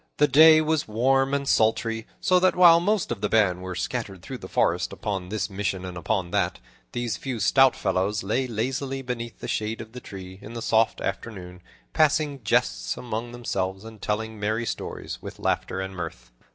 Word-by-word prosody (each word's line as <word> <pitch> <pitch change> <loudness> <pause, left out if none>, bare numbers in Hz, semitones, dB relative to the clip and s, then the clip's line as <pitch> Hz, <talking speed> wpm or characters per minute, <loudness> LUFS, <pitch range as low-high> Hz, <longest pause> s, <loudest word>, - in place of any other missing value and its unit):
The 150 - +5
day 155 +3 +8
was 155 -1 0
warm 135 +5 +2
and 140 0 -1
sultry, 115 0 +1
so 185 0 +3
that 185 +1 +3
while 170 -2 +8
most 200 - 0
of 110 -4 -3
the 105 - 0
band 95 -5 +3
were 95 0 -5
scattered 95 -2 -4
through 130 +3 -7
the - - -8
forest - - +1
upon 95 -3 -4
this 110 +1 -1
mission 95 -2 -3
and 90 -1 -6
upon 90 0 -2
that, - - 0 0.3
these 120 -4 -2
few 130 -4 -4
stout 130 +6 +5
fellows 95 +2 0
lay 125 +6 0
lazily 135 +4 -2
beneath 120 -2 -5
the - - -5
shade 110 +1 -2
of 110 -1 -8
the 125 - -8
tree, 95 -2 -9
in 110 - -9
the 115 - -4
soft 110 0 +2
afternoon, 90 -5 -5 0.3
passing 155 -3 +2
jests - - +1
among 120 0 -4
themselves 95 -5 -3
and 110 -2 -11
telling 110 +1 -2
merry 110 +3 -1
stories, - - -5
with - - -8
laughter - - -1
and 95 0 -5
mirth. - - -7
110 Hz, 190 wpm, -25 LUFS, 95-135 Hz, 0.3 s, day